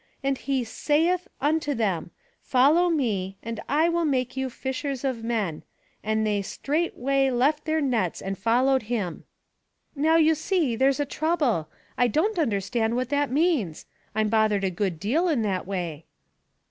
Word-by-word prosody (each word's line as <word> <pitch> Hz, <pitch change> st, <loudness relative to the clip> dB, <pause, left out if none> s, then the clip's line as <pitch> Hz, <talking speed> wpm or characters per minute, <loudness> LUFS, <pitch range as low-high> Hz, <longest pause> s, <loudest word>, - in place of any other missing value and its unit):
'And 275 Hz, 0 st, +1 dB
he 265 Hz, -1 st, -1 dB
saith 320 Hz, +9 st, 0 dB
unto 295 Hz, 0 st, 0 dB
them: 195 Hz, -8 st, -1 dB, 0.3 s
''Follow 295 Hz, +8 st, +4 dB
me, 200 Hz, -, -1 dB
and 230 Hz, -1 st, -5 dB
I 310 Hz, +4 st, +3 dB
will 340 Hz, 0 st, +1 dB
make 255 Hz, -5 st, 0 dB
you 265 Hz, 0 st, -2 dB
fishers 265 Hz, +1 st, -4 dB
of 255 Hz, -4 st, -2 dB
men. 215 Hz, -9 st, -2 dB, 0.4 s
And 220 Hz, 0 st, 0 dB
they 205 Hz, -1 st, +1 dB
straightway 275 Hz, -, 0 dB
left 275 Hz, +5 st, +1 dB
theii 315 Hz, -1 st, +1 dB
nets 225 Hz, -10 st, 0 dB
and 195 Hz, 0 st, -4 dB
followed 240 Hz, +4 st, +2 dB
him.' 205 Hz, -8 st, -3 dB, 0.2 s
" -, -, -51 dB
" -, -, -49 dB
Now, 310 Hz, +3 st, +3 dB
you 320 Hz, -1 st, +5 dB
see, 315 Hz, -, 0 dB
there's 265 Hz, +4 st, +2 dB
a 290 Hz, -, +1 dB
trouble. 285 Hz, -, 0 dB, 0.3 s
I 245 Hz, -, +5 dB
don't 350 Hz, -, 0 dB
un 300 Hz, -7 st, +2 dB
derstand 220 Hz, +3 st, -1 dB
what 250 Hz, 0 st, -1 dB
that 285 Hz, 0 st, +1 dB
means. 275 Hz, -, 0 dB, 0.3 s
I'm 215 Hz, -1 st, +1 dB
bothered 215 Hz, -2 st, +2 dB
a 190 Hz, -, +1 dB
good 180 Hz, -2 st, -2 dB
deal 285 Hz, -, +1 dB
in 270 Hz, -8 st, +1 dB
that 190 Hz, -3 st, -2 dB
way." 170 Hz, -5 st, -4 dB
255 Hz, 170 wpm, -25 LUFS, 215-295 Hz, 0.4 s, you